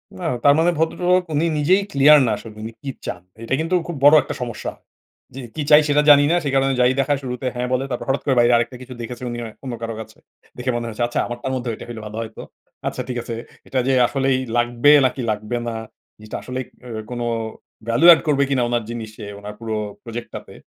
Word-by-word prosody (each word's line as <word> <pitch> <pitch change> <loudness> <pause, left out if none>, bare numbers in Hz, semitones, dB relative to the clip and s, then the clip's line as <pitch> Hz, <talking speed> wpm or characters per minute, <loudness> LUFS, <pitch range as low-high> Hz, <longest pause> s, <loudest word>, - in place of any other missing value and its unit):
না 180 - -7 0.2
তার 140 - +7
মানে 175 +2 +4
ভদ্রলোক 180 +3 +2
উনি 155 +3 +1
নিজেই 185 +7 +3
ক্লিয়ার 145 +2 +7
না 110 - +1
আসলে 110 -2 -11
উনি 115 - -5
কি 140 - -5 0.2
চান। 90 - -5 0.2
এইটা 115 - -3
কিন্তু 165 +3 0
খুব 170 - -4
বড় 145 +2 +8
একটা 145 +2 -6
সমস্যা। 120 -2 -4 0.6
জি - - -6 0.2
কী 155 - -2
চাই, 150 +1 +8
সেটা 145 0 +3
জানি 145 0 +8
না। - - +4
সে 140 - -1
কারণে 135 0 +3
যাই 125 0 +5
দেখায় 140 0 +1
শুরুতে 125 0 -5
হ্যাঁ 125 0 -2
বলে। 130 +1 +1
তারপর 125 - -4
হঠাৎ 135 - +1
করে 135 -3 +2
বাইরে 120 0 +5
আরেকটা 120 +1 0
কিছু 130 0 -9
দেখেছেন 120 +1 -6
উনি 120 - -5 0.2
অন্য 130 -3 -5
কারো 115 -1 -4
কাছে। 110 - -12 0.4
দেখে 125 +1 -1
মনে 120 0 -2
হয়েছে 115 +1 -3
"আচ্ছা 120 - -2
আমারটার 120 +2 -5
মধ্যে 125 -2 -3
ওইটা - - -8
হলে 115 -2 -7
ভালো 105 +1 -7
হয়তো। 110 -1 -8 0.5
আচ্ছা - - -3
ঠিক 125 - -3
আছে।" 115 - -5 0.3
এটা 130 - -1
যে 135 - +3
আসলেই 135 -1 +1 0.2
লাগবে 120 +4 +4
নাকি 130 0 -1
লাগবে 105 +3 -3
না? 115 - -3 0.4
জিনিসটা 110 0 -7
আসলেই 130 0 -4 0.2
ও - - -9 0.2
কোনো 120 -1 -3 0.6
value 125 +10 +6
add - - 0
করবে 140 -2 +3
কিনা 130 -3 +1
উনার 120 -2 0
জিনিসে, 110 -3 -7
উনার 105 +1 -8
পুরো 110 -1 -3 0.3
প্রজেক্ট 120 0 -7
টাতে, - - -9
125 Hz, 220 wpm, -21 LUFS, 120-145 Hz, 0.6 s, বড়